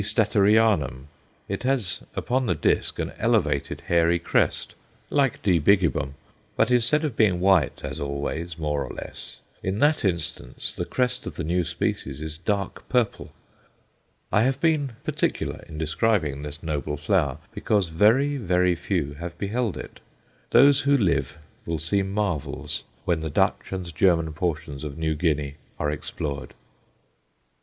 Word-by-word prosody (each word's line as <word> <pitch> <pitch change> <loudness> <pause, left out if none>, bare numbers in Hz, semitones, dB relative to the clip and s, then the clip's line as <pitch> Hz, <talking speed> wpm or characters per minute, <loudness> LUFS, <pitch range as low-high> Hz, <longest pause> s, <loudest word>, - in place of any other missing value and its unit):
Statterianum_. 105 - +3 0.4
It - - -3
has 125 -7 +1
upon 130 0 0
the 90 - +2
disc - - +1
an - - -2
elevated, - - +1
hairy 85 0 +3
crest, 85 - 0 0.4
like 140 -4 +1
D. 90 -4 +4
bigibbum, 80 -5 +2 0.4
but - - +2
instead 125 +6 +3
of 140 -7 -3
being 100 -6 +3
white 95 -6 +3
as - - -4
always, 70 +4 -3
more 75 -3 -1
or - - -7
less, - - -8 0.2
in 95 +1 -2
that 150 +5 +3
instance, 90 -4 -2
the - - -3
crest 125 0 -1
of - - -6
the - - -3
new 90 +3 +1
species 70 -3 -2
is 80 0 -5
dark 100 +2 -2
purple. 125 -4 0 1.0
I 105 - +4
have 135 +3 +1
been 150 -5 +1
particular - - -1
in 75 - -8
describing 80 -2 0
this 75 +2 -7
noble 75 -2 -2
flower, 75 -3 +1 0.2
because 100 -5 +1
very, 115 - +3
very 90 -5 +2
few 85 -4 -2
have 85 0 -6
beheld 110 +1 -1
it. - - -9 0.5
Those 140 +3 +6
who 140 0 +4
live 85 - 0 0.3
will 85 -1 -1
see 85 +6 +1
marvels 95 -5 -2 0.2
when 85 -2 +1
the 80 - -3
Dutch 70 - +1
and 90 -4 -5
German 85 -2 +3
portions 75 -4 -3
of 70 -2 -6
New 80 -1 0
Guinea 75 -3 -1 0.2
are 75 -1 0
explored. 70 -2 -5
90 Hz, 150 wpm, -25 LUFS, 75-110 Hz, 1.0 s, Those